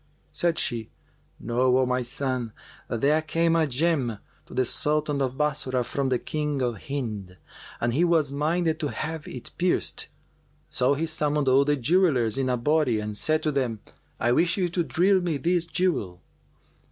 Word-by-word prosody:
Said 170 -1 +1
she, 115 -3 -2 0.5
"Know, 125 +2 +2
O 130 - +3
my 125 0 0
son, 125 -2 -3 0.3
that 115 - -3
there 150 +3 +3
came 165 +1 +1
a 160 -2 +3
gem 135 -4 0 0.3
to - - -12
the 130 - +2
Sultan 150 +2 0
of 130 -1 -1
Bassorah 140 -4 0
from 135 +2 -1
the 130 - +2
King 150 +1 -2
of 120 -4 -3
Hind, 110 -10 -4 0.4
and 120 0 0
he 160 +7 +2
was 165 -5 +2
minded 160 +3 0
to 150 - -1
have 155 +1 -4
it 125 - -8
pierced. 180 0 0 0.6
So 130 +3 +2
he 160 +3 -1
summoned 150 -3 0
all 135 +2 +5
the 145 0 +2
jewellers 135 - +2
in 130 -1 0
a 125 - +1
body 145 -3 +2
and 105 0 -4
said 155 +8 +1
to 155 - +1
them, 125 -6 -1 0.4
'I 120 - +2
wish 165 +9 +2
you 180 -2 +1
to 170 +1 0
drill 185 +4 +3
me 170 -4 -1
this 175 +3 +1
jewel. 160 - -1
140 Hz, 175 wpm, -26 LUFS, 125-160 Hz, 0.6 s, all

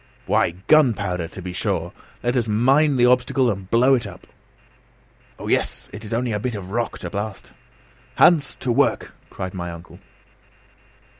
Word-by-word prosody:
"Why 85 - +1
gunpowder, 100 - +2
to 95 - -10
be 90 0 -6
sure! - - -2 0.3
Let 120 +1 0
us 120 -3 +1
mine 135 +7 +3
the 120 -1 +4
obstacle 125 +1 +3
and 95 -2 -7
blow 125 +4 +4
it 125 -3 +1
up." - - -12 1.1
"Oh, - - -8
yes, - - 0
it 105 +1 -8
is 105 - -8
only 120 +1 -1
a 105 - -1
bit 120 +2 -3
of 95 -2 -7
rock 115 +1 -2
to - - -6
blast!" 100 0 -5 0.6
"Hans, 165 -4 +4
to 125 - 0
work!" - - +1 0.2
cried 95 0 -6
my 90 -2 -5
uncle. 85 0 -11
115 Hz, 165 wpm, -22 LUFS, 95-125 Hz, 1.1 s, the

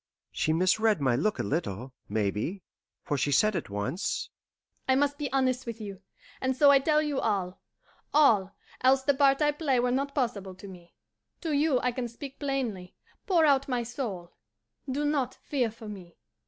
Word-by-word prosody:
She 155 - 0
misread 185 +5 +3
my 130 -4 +2
look 185 - 0
a - - -1
little, 130 - -3 0.2
maybe, 105 - -2 0.4
for 145 -2 -1
she 145 - 0
said 210 +9 +3
at 170 - -3
once: 105 - -3 0.6
"I 260 - +4
must 285 +1 +1
be 290 -2 -3
honest 260 -2 +1
with 230 -1 -5
you, 200 -3 -7 0.4
and 260 0 0
so 285 0 +7
I 275 - +6
tell 305 +2 +2
you 290 -3 -1
all 190 -4 -1 0.5
all, 210 -10 +4 0.3
else 265 +1 +4
the 285 - +3
part 275 +1 +3
I 295 - +4
play 290 -4 0
were 245 0 +1
not 275 +2 -1
possible 205 -8 -2
to 190 +2 -11
me. 175 -3 -13 0.5
To 325 - -2
you 285 -2 +3
I 250 - +1
can 245 0 -3
speak 265 +4 -10
plainly, 245 -11 -3 0.3
pour 345 -5 +4
out 275 -2 +3
my 250 -3 -1
soul. 225 -8 -5 0.6
Do 285 +3 -1
not 275 -4 0
fear 255 -5 -1
for 220 0 -11
me. 185 -5 -10
240 Hz, 180 wpm, -28 LUFS, 185-275 Hz, 0.6 s, so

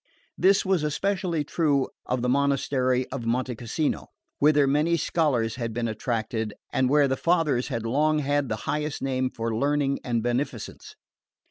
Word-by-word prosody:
This 190 +2 +3
was 190 -3 +2
especially 170 +1 -1
true 145 -3 +1 0.2
of 125 -1 -1
the - - +1
monastery 130 -1 +1
of 125 -4 -4
Monte 125 +2 0
Cassino, 120 +7 -2 0.3
whither 150 -1 +5
many 150 +5 +2
scholars 125 -10 0
had 115 -3 -3
been 120 -1 -1
attracted 110 -1 -2 0.2
and 130 -1 +2
where 145 0 +4
the 130 - 0
fathers 155 -5 +1
had 115 -5 -3
long 150 +6 +2
had 145 -2 0
the 110 - 0
highest 150 0 -2
name 130 -1 0
for 115 -2 -3
learning 140 +2 +1
and 120 -3 -1
beneficence. 120 -2 -3
135 Hz, 155 wpm, -26 LUFS, 120-150 Hz, 0.3 s, whither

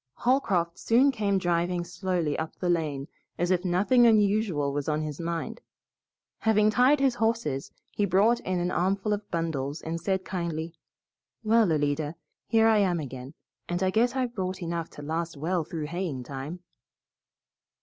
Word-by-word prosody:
Holcroft 195 -10 +1
soon 255 +5 +4
came 205 -5 0
driving 175 -1 0
slowly 175 -3 -2
up 160 0 -4
the 180 -1 0
lane 150 -5 -1 0.3
as 175 +1 0
if 180 -1 +2
nothing 205 +7 +4
unusual 205 -9 +2
was 145 +1 -2
on 155 0 0
his 150 -2 -5
mind. 170 +7 -4 0.8
Having 215 -1 +3
tied 255 +6 +4
his 270 -2 +3
horses, 225 - -1 0.2
he 205 - 0
brought 200 +6 +3
in 185 -1 -2
an 175 +1 -1
armful 195 +4 0
of 205 0 -5
bundles 160 -3 -2
and 165 +1 -4
said 190 +1 -1
kindly, 170 -3 -3 0.7
"Well, 220 -4 +4
Alida, 145 +1 0 0.3
here 225 -1 +4
I 220 -1 +5
am 180 -4 +2
again, 130 0 -7 0.3
and 175 +2 -1
I 185 - +2
guess 240 +5 +2
I've 250 -2 -1
brought 185 -3 -3
enough 170 -1 -3
to 145 - -11
last 160 +1 -3
well 170 +3 0
through 155 -1 -5
haying 165 -5 -3
time." 140 +7 -7
175 Hz, 160 wpm, -27 LUFS, 160-210 Hz, 0.8 s, I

